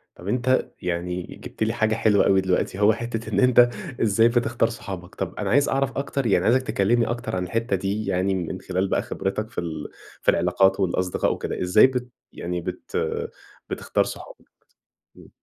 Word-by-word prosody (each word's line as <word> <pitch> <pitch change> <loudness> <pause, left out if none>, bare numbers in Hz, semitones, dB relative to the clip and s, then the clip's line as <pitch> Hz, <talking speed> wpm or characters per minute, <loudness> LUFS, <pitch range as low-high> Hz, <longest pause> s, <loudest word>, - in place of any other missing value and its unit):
طب 90 - -9
أنت 125 +3 +1
يعني 90 0 -2 0.2
جِبت - - -7
لي 110 +1 +1
حاجة 110 -1 +1
حلوة 110 -2 +3
أوي 95 -1 +4
دلوقتي، 95 0 -1
هو 105 +1 +6
حتّة 115 0 -4
إن - - +2
أنت 125 -1 +6 0.3
إزاي 115 +1 +4
بتختار 120 -1 +1
صحابك. 95 -6 -8
طب - - -4
أنا 100 -2 -3
عايز 140 +5 +4
أعرف 135 -1 0
أكتر، 140 -1 -2
يعني 95 -4 +3
عايزك 130 +3 +4
تكلّمني 115 0 +1
أكتر 120 -5 -3
عن 90 - -1
الحتّة 115 +3 -1
دي 100 +3 -2
يعني 95 0 +1
من 95 0 -4
خلال 95 +1 -1
بقى - - +1
خبرتك 105 +3 -3
في - - -14
ال 80 -3 -5 0.3
في - - +5
العلاقات 95 +3 +2
والأصدقاء 90 -1 0
وكده، - - -4
إزاي 90 +6 +6
بت 125 -1 -3 0.2
يعني 90 0 -4
بت - - -6 0.7
بتختار - - 0
صحابك؟ - - -9 0.7
إمم. - - -15
105 Hz, 180 wpm, -24 LUFS, 95-120 Hz, 0.7 s, هو